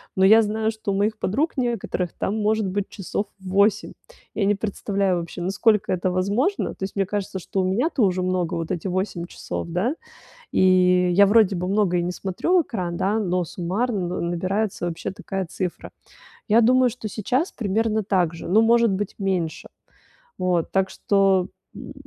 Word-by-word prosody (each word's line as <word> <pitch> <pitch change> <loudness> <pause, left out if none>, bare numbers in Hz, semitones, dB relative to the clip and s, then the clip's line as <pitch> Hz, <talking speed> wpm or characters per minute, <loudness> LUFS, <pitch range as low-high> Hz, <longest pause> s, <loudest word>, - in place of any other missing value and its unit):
Но 190 - +2
я 220 +3 +7
знаю, 220 +1 -1
что 220 -1 -4
у - - -1
моих 215 +2 0
подруг 280 - -1
некоторых 230 -8 -2
там 215 - -2
может 215 0 +1
быть 195 +1 -2
часов 200 +1 -4
8. 200 +3 +1 0.4
Я 205 - 0
не 205 +1 +3
представляю 200 -2 -1
вообще, 170 +1 -7
насколько 205 +3 +2
это 185 +1 0
возможно, 205 - 0
то - - -8
есть 190 - -5
мне 195 -1 +1
кажется, 195 -1 -3
что 190 - -4
у - - 0
меня-то 250 - 0
уже 185 -2 +1
много. 180 -1 -1
Вот 165 -1 -4
эти 175 +2 -3
8 185 -1 -2
часов, 175 - -6
да, 185 - 0 0.6
и 180 -1 +4
я 200 +3 +6
вроде 210 -2 +4
бы 180 +1 -3
много 195 -3 +2
и - - 0
не 175 - -2
смотрю 195 - 0
в 345 - +4
экран, 180 - -4
да, 205 +5 0
но 180 -3 0
суммарно 185 +4 -2
на 180 - -3
набирается 185 +3 -2
вообще 170 +1 -4
такая 195 0 -4
цифра. 180 +2 -5 0.6
Я 225 +2 +5
думаю, 255 +2 +4
что 230 -2 -8
сейчас 250 - -1
примерно 220 0 0
так 185 -5 +1
же, 165 - -8
ну, 215 +5 +5
может 235 0 +4
быть, 195 +1 -3
меньше. 185 -5 -2 0.7
Вот. 180 -2 0
Так 190 0 +2
что 195 -2 +2 0.3
м, - - -9
195 Hz, 180 wpm, -23 LUFS, 180-215 Hz, 0.7 s, я